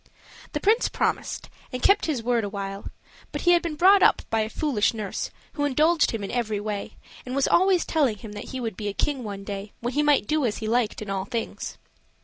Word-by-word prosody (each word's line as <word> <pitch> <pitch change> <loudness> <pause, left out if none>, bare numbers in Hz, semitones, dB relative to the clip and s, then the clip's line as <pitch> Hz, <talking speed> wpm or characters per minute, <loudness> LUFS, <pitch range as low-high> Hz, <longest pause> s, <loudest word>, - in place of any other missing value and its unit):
The - - -1
prince 440 +4 +3
promised, - - -2 0.2
and 250 -1 -5
kept 400 -2 +4
his 275 -8 -1
word 240 -1 +1
a 205 - -2
while; 195 0 -5 0.4
but - - -4
he 350 - +4
had 345 -1 +5
been 335 -3 -3
brought 380 +5 +6
up - - +5
by 225 - +2
a 215 0 0
foolish 235 -5 +1
nurse, 210 -3 -3 0.2
who 290 - -2
indulged 305 +4 +3
him 225 -3 -3
in 195 - -4
every 220 -4 -1
way 205 -1 -4 0.3
and 255 +1 -5
was 275 - +2
always 370 -1 +4
telling 275 -10 +1
him 220 0 -9
that 205 0 -7
he 260 - -6
would 225 -5 -3
be 210 - -4
a 205 - -2
king 275 +3 -1
one 200 -2 -6
day, 200 +1 -6
when 240 +2 -3
he 295 - +2
might 295 -6 +3
do 305 +5 +1
as 225 -4 0
he 220 - -4
liked 225 -2 0
in 200 - -6
all 190 -1 -2
things. 230 +1 -4
240 Hz, 235 wpm, -25 LUFS, 210-295 Hz, 0.4 s, brought